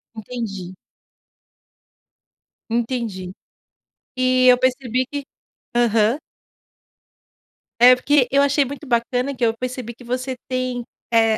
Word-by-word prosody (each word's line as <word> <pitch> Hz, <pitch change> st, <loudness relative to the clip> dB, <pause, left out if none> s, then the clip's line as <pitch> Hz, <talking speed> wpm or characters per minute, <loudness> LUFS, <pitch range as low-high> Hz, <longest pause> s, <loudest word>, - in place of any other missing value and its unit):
Entendi. 205 Hz, -5 st, -6 dB, 2.0 s
Entendi. 225 Hz, -6 st, -2 dB, 0.8 s
E, 255 Hz, 0 st, +3 dB
eu 250 Hz, 0 st, +8 dB
percebi 255 Hz, -1 st, 0 dB
que 285 Hz, -1 st, -5 dB, 0.5 s
aham. 230 Hz, +1 st, +3 dB, 1.6 s
É 250 Hz, +1 st, +9 dB
porque 260 Hz, +1 st, +2 dB
eu 280 Hz, +1 st, +4 dB
achei 280 Hz, 0 st, +3 dB
muito 285 Hz, +3 st, -8 dB
bacana 250 Hz, +3 st, 0 dB
que 245 Hz, -1 st, +1 dB
eu 225 Hz, -1 st, +1 dB
percebi 250 Hz, -1 st, -5 dB
que 245 Hz, -, -16 dB
você 255 Hz, +2 st, -3 dB
tem, 255 Hz, -1 st, -2 dB, 0.3 s
eh, 225 Hz, -1 st, +4 dB
250 Hz, 105 wpm, -21 LUFS, 230-255 Hz, 2.0 s, É